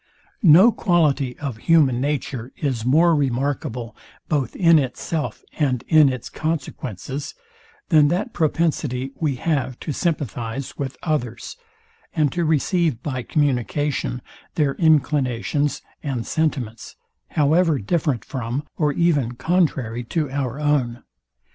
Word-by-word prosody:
No 190 +4 +7
quality 150 - +1
of 135 -6 -5
human 135 -3 +3
nature 135 -4 -3
is 130 -7 -2
more 160 +7 +4
remarkable, 130 -4 -1 0.3
both 135 -6 -1
in 165 -3 +5
itself 145 +3 -3 0.2
and 130 -5 +1
in 155 -3 +6
its 130 -2 -6
consequences, 140 - -4 0.5
than 155 -3 +6
that 185 - -1
propensity 150 -5 0
we 150 -5 0
have 130 -3 -1
to 155 - -3
sympathize 135 - -3
with 135 -2 -5
others, 125 -8 -2 0.6
and 150 -4 +2
to 175 - -1
receive 160 - +1
by 130 -4 -3
communication 140 -1 -1 0.3
their 145 -3 +2
inclinations 145 -2 +1 0.2
and 130 -6 -3
sentiments, 130 -8 -2 0.4
however 155 +2 +3
different 135 - -1
from, 125 +2 -3
or 150 -2 +2
even 145 -8 +1
contrary 130 -6 0
to 150 +1 -2
our 135 -1 -2
own. 140 -6 0
145 Hz, 115 wpm, -22 LUFS, 125-155 Hz, 0.6 s, No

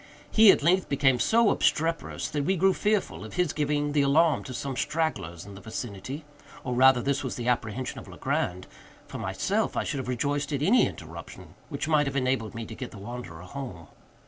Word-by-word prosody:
He, 220 -1 +7
at 170 - +5
length, 180 +3 +3
became 135 -3 +3
so 225 - +4
obstreperous 165 +1 0
that 145 -1 -1
we 190 +7 +1
grew 190 +2 +4
fearful 210 0 0
of - - -9
his 180 -4 +1
giving 145 0 0
the 145 0 +3
alarm 150 +2 +3
to 130 - -7
some 135 +2 -4
stragglers 100 - -2
in 100 - -10
the 95 - -11
vicinity—or, 125 +5 -7
rather, 130 0 +5
this 140 0 0
was 130 - -3
the 120 -1 -4
apprehension 125 +1 -1
of - - -12
Legrand;—for 90 +1 -5
myself, - - -1
I - - +1
should 140 - -3
have 130 - -5
rejoiced 140 +4 -1
at 140 0 -1
any 235 +10 +5
interruption - - -10 0.2
which 140 -2 -3
might 150 -2 +3
have 140 - -3
enabled 130 -4 0
me 115 0 -5
to - - -9
get 125 - -6
the - - -12
wanderer 100 -6 -8
home. 90 -5 -8
140 Hz, 195 wpm, -27 LUFS, 120-150 Hz, 0.2 s, He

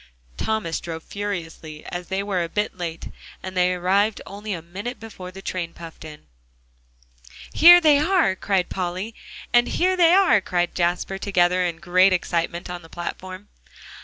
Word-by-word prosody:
Thomas 215 -7 -2
drove 165 -1 -7
furiously, 165 -6 -6
as 175 0 -6
they 190 +1 -2
were 190 -4 -1
a 165 - -5
bit 210 +3 -2
late, 170 -2 -6 0.3
and 185 0 -7
they 180 0 +3
arrived 195 +4 +1
only 205 +2 -7
a 175 -4 -3
minute 200 +9 -7
before 205 -5 -9
the 190 +1 -11
train 170 -2 -4
puffed 165 -1 -11
in. 150 - -11 1.3
"Here 350 +2 +9
they 305 -4 +5
are!" 330 - +2
cried 190 -1 0
Polly, 185 +4 -4 0.4
and 240 0 +5
"Here 370 +1 +1
they 340 -2 +5
are!" 375 - +5
cried 175 -2 -1
Jasper, 180 +2 -1
together, 180 -2 +2
in 170 -2 -2
great 185 +2 +3
excitement, 170 0 -2
on 180 -1 -6
the 165 - -15
platform. 185 +3 -7
185 Hz, 160 wpm, -23 LUFS, 175-205 Hz, 1.3 s, Here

